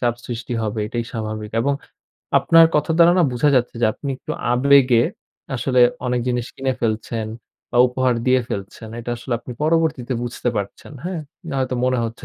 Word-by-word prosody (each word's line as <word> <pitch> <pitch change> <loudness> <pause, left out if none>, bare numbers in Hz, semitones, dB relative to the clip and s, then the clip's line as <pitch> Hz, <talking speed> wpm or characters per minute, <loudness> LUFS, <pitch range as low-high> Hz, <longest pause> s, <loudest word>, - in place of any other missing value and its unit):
চাপ 120 -2 +1
সৃষ্টি 120 0 -5
হবে। 110 0 -2
এটাই 120 +1 -3
স্বাভাবিক। 110 -2 -4
এবং 140 +3 +1 0.6
আপনার 165 0 +6
কথা 150 +2 +1
দ্বারা 170 +1 +7
না - - +5
বুঝা 125 +4 +2
যাচ্ছে 120 -1 0
যে 115 - +6
আপনি 140 - -6
একটু - - -6 0.2
আবেগে 130 -2 +5 0.5
আসলে 125 0 +1 0.3
অনেক 125 0 0
জিনিস 120 -1 -1
কিনে 135 0 -1
ফেলছেন 115 0 -2 0.4
বা - - -3
উপহার 125 0 +1
দিয়ে 130 0 +4
ফেলছেন। 100 +3 -6
এটা 120 +1 -5
আসলে 125 +1 -6
আপনি 125 - -8
পরবর্তীতে 155 -6 +1
বুঝতে 120 0 -3
পারছেন, 100 +7 -5
হ্যাঁ? 180 -2 -3 0.3
না - - -4
হয়তো 130 -1 -1
মনে 130 -1 +1
হচ্ছে 115 0 -6
125 Hz, 175 wpm, -21 LUFS, 115-135 Hz, 0.6 s, দ্বারা